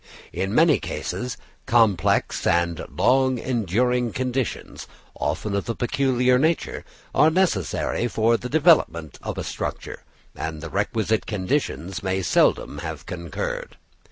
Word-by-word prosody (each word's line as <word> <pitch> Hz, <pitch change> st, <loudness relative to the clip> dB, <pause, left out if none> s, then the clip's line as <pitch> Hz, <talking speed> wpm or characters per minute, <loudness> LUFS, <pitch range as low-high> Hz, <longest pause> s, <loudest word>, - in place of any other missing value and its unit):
In 95 Hz, +3 st, -2 dB
many 160 Hz, -2 st, +5 dB
cases 125 Hz, -1 st, -4 dB, 0.3 s
complex 110 Hz, -7 st, +2 dB
and 85 Hz, -1 st, +1 dB
long 130 Hz, 0 st, +2 dB
enduring 120 Hz, +1 st, 0 dB
conditions, 130 Hz, -1 st, -3 dB, 0.3 s
often 105 Hz, -2 st, -2 dB
of 100 Hz, +4 st, -2 dB
a 115 Hz, -, -1 dB
peculiar 125 Hz, 0 st, +2 dB
nature, 160 Hz, +4 st, 0 dB, 0.3 s
are 155 Hz, -, +5 dB
necessary 155 Hz, -, 0 dB
for 115 Hz, 0 st, +2 dB
the 125 Hz, +2 st, -4 dB
development 140 Hz, -, +3 dB
of -, -, -5 dB
a -, -, -3 dB
structure; -, -, -5 dB, 0.3 s
and 80 Hz, -1 st, -4 dB
the 80 Hz, +1 st, -7 dB
requisite 110 Hz, +1 st, 0 dB
conditions 95 Hz, -, -2 dB
may 95 Hz, 0 st, -1 dB
seldom -, -, +2 dB
have -, -, -6 dB
concurred. 85 Hz, -3 st, -5 dB
115 Hz, 125 wpm, -23 LUFS, 95-130 Hz, 0.3 s, many